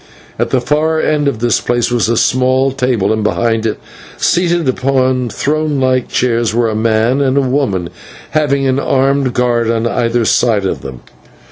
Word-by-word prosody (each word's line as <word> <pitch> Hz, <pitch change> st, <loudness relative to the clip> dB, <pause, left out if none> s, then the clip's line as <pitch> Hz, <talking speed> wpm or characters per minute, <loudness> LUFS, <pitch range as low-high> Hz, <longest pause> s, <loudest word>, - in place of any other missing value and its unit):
At -, -, 0 dB
the 130 Hz, -, +1 dB
far 155 Hz, +5 st, 0 dB
end 150 Hz, -2 st, 0 dB
of 140 Hz, -, -1 dB
this 120 Hz, -2 st, +1 dB
place 120 Hz, -1 st, -1 dB
was 120 Hz, -2 st, +1 dB
a 115 Hz, -, +1 dB
small 130 Hz, +2 st, +2 dB
table, 125 Hz, -6 st, 0 dB
and 110 Hz, -1 st, -2 dB
behind 115 Hz, +1 st, 0 dB
it, 110 Hz, -, -3 dB, 0.4 s
seated 175 Hz, -3 st, +1 dB
upon 130 Hz, -1 st, 0 dB
throne 150 Hz, +4 st, -1 dB
like 130 Hz, -1 st, +1 dB
chairs, 115 Hz, -3 st, 0 dB
were 120 Hz, -1 st, +1 dB
a 110 Hz, -, -3 dB
man 115 Hz, +4 st, +1 dB
and 135 Hz, 0 st, +1 dB
a -, -, +4 dB
woman, 125 Hz, -10 st, -1 dB, 0.4 s
having 140 Hz, -3 st, +1 dB
an 130 Hz, 0 st, +1 dB
armed 135 Hz, -1 st, 0 dB
guard 120 Hz, -2 st, +1 dB
on 115 Hz, 0 st, 0 dB
either 115 Hz, 0 st, 0 dB
side 110 Hz, -3 st, +2 dB
of -, -, -2 dB
them. 65 Hz, -2 st, -9 dB
125 Hz, 175 wpm, -14 LUFS, 115-135 Hz, 0.4 s, a